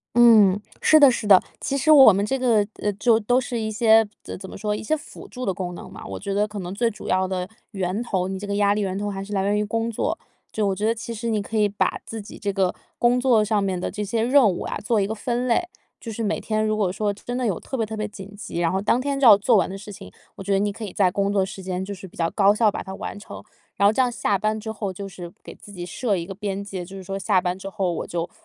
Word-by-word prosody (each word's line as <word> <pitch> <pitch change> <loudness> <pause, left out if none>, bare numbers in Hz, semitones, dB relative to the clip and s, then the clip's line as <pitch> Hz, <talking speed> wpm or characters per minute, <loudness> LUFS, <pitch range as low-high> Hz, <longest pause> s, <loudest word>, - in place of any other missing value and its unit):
嗯， 215 -5 +6 0.2
是 310 - +6
的 280 -3 +8
是 240 -3 -3
的， 195 -3 +8 0.2
其 275 - -2
实 295 +3 +4
我 270 -8 +9
们 200 +2 0
这 270 +5 -1
个 230 -5 +2
呃， 205 - -1
就 225 +2 +3
都 245 +4 +2
是 245 -2 -4
一 220 - -2
些 220 0 +4 0.2
怎 - - -7
怎 190 0 -9
么 - - -9
说， 210 +1 -2
一 - - -5
些 310 +8 0
辅 300 - -12
助 255 0 -6
的 195 - 0
功 180 -2 -5
能 - - -10
嘛。 - - -10
我 - - -6
觉 200 0 -4
得 205 +2 +1
可 210 -2 -6
能 180 +2 -6
最 235 +2 +1
主 205 - -9
要 185 0 +1
的 185 0 -3 0.2
源 195 +2 -2
头， 190 -6 -1
你 190 0 -4
这 205 - -6
个 200 - -2
压 205 0 +3
力 210 - -1
源 195 -2 -2
头 205 0 -2
还 195 0 -5
是 205 - -9
来 195 -1 0
源 205 +1 +1
于 210 - +1
工 225 +2 -2
作， 225 - -2 0.3
就 215 -1 -1
我 195 - +1
觉 210 +3 -2
得 230 - +2
其 230 +1 -6
实 230 +2 -4
你 215 -2 0
可 220 - -5
以 210 -1 +3
把 205 +1 -1
自 225 -2 -6
己 - - -11
这 200 -1 -2
个 190 -2 +1 0.2
工 245 +1 +3
作 245 -4 +4
上 210 -1 +1
面 190 -2 -1
的 175 - -3
这 210 - -5
些 220 +2 -1
任 255 -1 +5
务 175 - -4
啊， - - -4
做 220 0 +1
一 195 - +1
个 220 - -3
分 240 +3 -2
类。 300 +9 +1 0.3
就 230 - -7
是 230 - -4
每 210 0 -1
天 215 0 -1
如 215 0 0
果 200 -4 0
说 205 +1 -1
真 245 +4 -6
的 255 - -1
有 200 -7 0
特 265 - -6
别 225 - 0
特 220 +1 -6
别 215 - -2
紧 200 -1 -10
急， 175 -4 -5
然 165 - +2
后 190 - 0
当 220 +4 +2
天 280 +1 -2
就 275 - +3
要 205 - +10
做 220 +3 +3
完 190 - +2
的 195 - -6
事 205 +1 -10
情， 135 - -10 0.3
我 - - -7
觉 200 - -1
得 195 - +3
你 205 - +1
可 220 +2 -7
以 195 - -6
在 185 -3 +3
工 200 +1 0
作 195 -2 +2
时 190 0 -8
间 185 0 -3
就 200 - -6
是 190 -1 -9
比 180 - -17
较 165 -1 0
高 200 -1 +4
效 215 0 +3
把 - - -6
它 190 - -7
完 - - -6
成， 205 - -10 0.3
然 200 - 0
后 205 - +6
这 240 - 0
样 250 -1 +3
下 205 -4 0
班 215 +2 -1
之 220 - -6
后， 205 -3 -4
就 195 +2 -7
是 180 -2 -9
给 - - -11
自 205 - -14
己 175 -2 -6
设 205 +3 -1
一 170 - -3
个 195 - -7
边 200 -1 -3
界， 190 -3 -6
就 190 +2 -11
是 190 - -8
说 195 +1 -5
下 195 -1 +2
班 180 +1 -2
之 195 - -7
后 195 -3 -1
我 165 - -4
就 170 0 -3
205 Hz, 335 characters per minute, -23 LUFS, 195-225 Hz, 0.3 s, 要